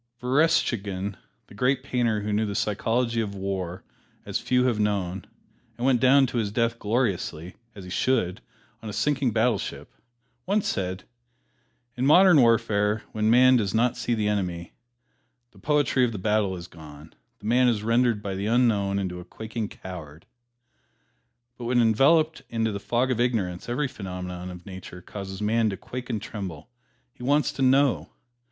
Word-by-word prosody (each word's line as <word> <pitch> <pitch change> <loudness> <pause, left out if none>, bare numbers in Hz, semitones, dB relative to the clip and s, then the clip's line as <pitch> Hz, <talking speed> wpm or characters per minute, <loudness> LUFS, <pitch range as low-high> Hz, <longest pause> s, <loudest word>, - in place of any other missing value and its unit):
Verestchagin, 120 - +1 0.3
the - - -17
great 130 +4 +1
painter 120 -5 0
who 105 0 -2
knew 110 +1 +1
the 100 - -4
psychology 115 +3 0
of 100 -2 -4
war 95 -2 -4 0.4
as - - -2
few 125 0 +1
have 120 -4 +1
known, 100 -3 -1 0.5
and 120 - -3
went 130 -3 +3
down 135 +1 +6
to 120 -1 -2
his 105 -3 -2
death 115 +1 0
gloriously, 100 -7 -1 0.2
as 100 - -9
he 90 - -9
should, 105 -6 0 0.4
on 110 - -7
a - - -6
sinking 140 +3 +1
battleship, 110 -1 -1 0.5
once 200 +1 +1
said, 95 -1 -2 0.9
"In 125 +2 0
modern 175 -1 +7
warfare, 110 -2 +2
when 110 0 0
man 130 +2 +6
does 105 -2 -1
not 120 +2 +2
see 120 - -1
his 105 -2 0
enemy, 90 -5 -2 0.8
the - - -19
poetry 145 -3 +2
of 120 - +2
the - - -4
battle 105 -1 0
is 85 -1 -8
gone, 75 -2 -13 0.3
and 105 - -8
man 125 +2 +4
is 110 -4 +1
rendered 115 -1 +2
by 100 - -3
the 100 +2 -3
Unknown 110 -5 +2
into 90 -2 -3
a - - -8
quaking 110 +3 -6
coward." 85 -4 -10 1.3
But 120 - -6
when 120 +1 +2
enveloped 145 +8 +3
in 115 -1 -2
the 105 -3 -1
fog 120 +5 0
of 120 - -1
ignorance 110 -7 -1
every 135 +4 0
phenomenon 90 -4 -6
of 90 -1 -10
Nature 95 -2 -10
causes 95 0 -7
man 110 +1 +2
to 95 - -4
quake 125 0 -7
and 115 -3 -1
tremble 95 - -7 0.4
he - - -18
wants 145 +4 +2
to 145 - -6
know! 135 +1 +3
110 Hz, 170 wpm, -25 LUFS, 95-125 Hz, 1.3 s, modern